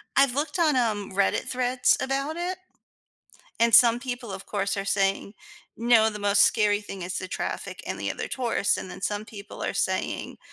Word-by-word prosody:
I've 275 -2 +4
looked 305 +5 -2
on, 310 -4 +3
um, 215 -6 0
Reddit 195 +1 +1
threads 250 0 +2
about 275 +3 -2
it, 360 +2 -3 1.0
and 230 -1 +4
some 235 0 +7
people, 245 -4 -5
of 190 0 -8
course, 200 -1 -2
are 195 0 -3
saying, 195 +1 0 0.4
"No, 230 -1 +4
the 210 -1 -5
most 205 -1 +4
scary 210 -2 +3
thing 195 -2 -8
is 180 +1 -3
the 185 - -6
traffic - - -5
and - - -4
the - - -2
other - - -4
tourists," 235 -5 0
and 185 - -7
then 190 - -10
some 205 +1 -2
people 205 -2 -10
are - - -2
saying, - - -2
220 Hz, 190 wpm, -26 LUFS, 200-250 Hz, 1.0 s, some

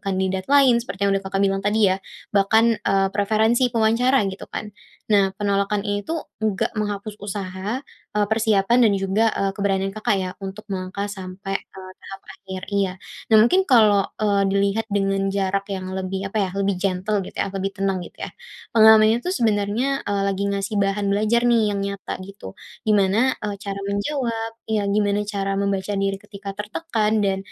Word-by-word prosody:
kandidat 190 -1 -2
lain, 270 -4 +5
seperti 200 -4 -4
yang 200 - +3
udah 195 - -13
Kakak 195 +1 0
bilang 195 0 +1
tadi 205 0 +3
ya. 190 - -3 0.3
Bahkan, 205 +3 +4 0.2
eee, 195 0 +3
preferensi 220 +5 +2
pewawancara 235 +4 +3
gitu 190 - -9
kan. 210 0 -6 0.4
Nah 195 -2 +4
penolakan 200 0 +1
ini 205 0 -1
tuh, 325 0 -2 0.2
nggak 215 -3 0
menghapus 210 0 -3
usaha, 200 +3 -4 0.4
eee, 210 -1 +3
persiapan 220 0 +2
dan - - +2
juga, 195 +3 +1
eee, 195 0 0
keberanian 195 -1 0
Kakak 215 -1 0
ya 185 -1 -3
untuk 195 +2 -7
melangkah 190 +1 -3
sampai 195 0 -5
ke 190 - -14 0.2
tahap 195 0 -10
akhir 190 -1 -8
iya. 200 -2 +1 0.4
Nah - - +8
mungkin 365 - +4
kalo, 215 -6 +5
eee, 200 -2 +2
dilihat 200 +3 +1
dengan 195 -1 +1
jarak 195 0 0
yang 190 -1 -4
lebih 190 +1 -3
apa 220 - 0
ya, 185 - -4
lebih 200 -1 0
gentle 195 +2 0
gitu - - -11
ya, - - 0
lebih 195 0 -3
tenang 195 -1 0
gitu - - -14
ya, - - -7 0.4
pengalamannya 220 0 +7
tuh 360 - -1
sebenernya, 230 +4 0
eee, 200 -1 -1
lagi 195 0 -1
ngasih 200 +1 -2
bahan 200 +1 0
belajar 215 +3 +2
nih 235 - +4 0.2
yang 200 - -2
nyata 200 -1 -5
gitu. 195 - -10 0.3
Gimana, 210 +4 +3
eee, 205 -1 -3
cara 200 -1 -4
menjawab 225 +1 -2 0.2
iya 215 -2 0
gimana 205 0 +1
cara 195 -1 -2
membaca 200 0 -1
diri 195 0 -1
ketika 200 -1 -8
tertekan 215 0 -1
dan, 195 -1 +1
200 Hz, 175 wpm, -22 LUFS, 195-215 Hz, 0.4 s, Nah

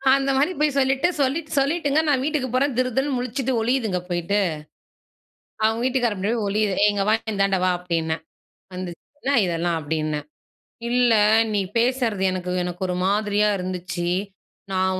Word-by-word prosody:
அந்த 275 0 0
மாதிரி 285 +6 +2
போய் 300 -2 +1
சொல்லிட்டு 270 +3 +2
சொல்லி 275 +4 +1 0.2
சொல்லிட்டுங்க 290 +1 +2
நான் 265 -2 +2
வீட்டுக்கு 295 -3 -1
போறேன், 270 0 +1
திருதிருன்னு 255 +2 0
முழிச்சுட்டு 250 +2 -2
ஒளியிதுங்க 225 -6 0
போய்ட்டு. 175 +4 0 1.2
அவங்க 220 +1 +2
வீட்டுக்காரன் 245 -5 +1
பின்னாடி 215 +5 0
போய் 205 - -1
ஒளியுது. 210 -1 +1
"ஏ! - - +7
இங்கே 200 -1 0
வா - - +5 0.2
இந்தாண்ட 195 -1 +1
வா" 185 - +3
அப்படின்னேன், 165 -2 -2 0.5
வந்துச்சு. 180 -2 -6 0.2
"என்ன 280 0 0
இதெல்லாம்?" 170 -1 -1
அப்டீன்னேன், 155 -1 -2 0.6
"இல்ல 245 -1 +3 0.4
நீ 205 - +2 0.2
பேசறது 235 -4 +1
எனக்கு 180 -1 -3
எனக்கு 180 +1 -4
ஒரு 180 - -1
மாதிரியா 210 +1 +2
இருந்துச்சு. 180 -1 -4 0.7
நான் 185 0 +1
210 Hz, 150 wpm, -23 LUFS, 185-260 Hz, 1.2 s, ஏ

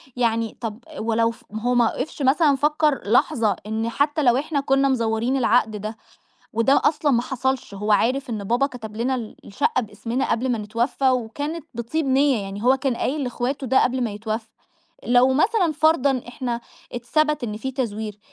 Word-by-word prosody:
يعني 230 -2 0
طَب 225 0 -4 0.2
ولو 230 +1 +1 0.2
هو 245 +3 0
ما 240 -1 +5
وقفش 285 +2 -5
مثلًا 280 +2 +4
فكّر 295 0 +1
لحظة 225 -4 +3
إن 220 +1 -2
حتّى 290 +4 0
لو 245 0 +4
إحنا 290 +1 -1
كنا 275 0 +2
مزورين 230 +1 0
العقد 225 -2 +2
ده، 215 +2 -6 0.6
وده 230 +5 +3
أصلًا 295 -2 +2
ما 235 - +2
حصلش 265 -3 -2
هو 210 +2 -1
عارف 250 +5 +1
إن 210 -3 -4
بابا 240 +7 +2
كَتَب 220 -5 -9
لنا 255 +3 0
ال 230 -4 -6
الشقة 255 +4 0
باسمنا 230 +4 -3
قبل 250 +3 0
ما 230 - -1
نتوفى 235 +5 0
وكانت 285 +6 -3
بطِيب 270 +6 -2
نية، 265 -4 +3
يعني 195 +2 -6
هو 260 +2 +5
كان 260 -2 -1
قايل 290 +3 -1
لإخواتُه 255 +2 -3
ده 265 +2 +4
قبل 255 0 0
ما 225 - -2
يتوفى، 220 +2 -4 0.6
لو 245 +2 +5
مثلًا 360 - +2
فرضًا 285 -5 +2
إحنا 245 -1 -3 0.3
اتثبَت 300 +4 0
إن 210 -2 -4
في 265 +4 -4
تزوير، 215 -5 -4
245 Hz, 175 wpm, -23 LUFS, 225-275 Hz, 0.6 s, ما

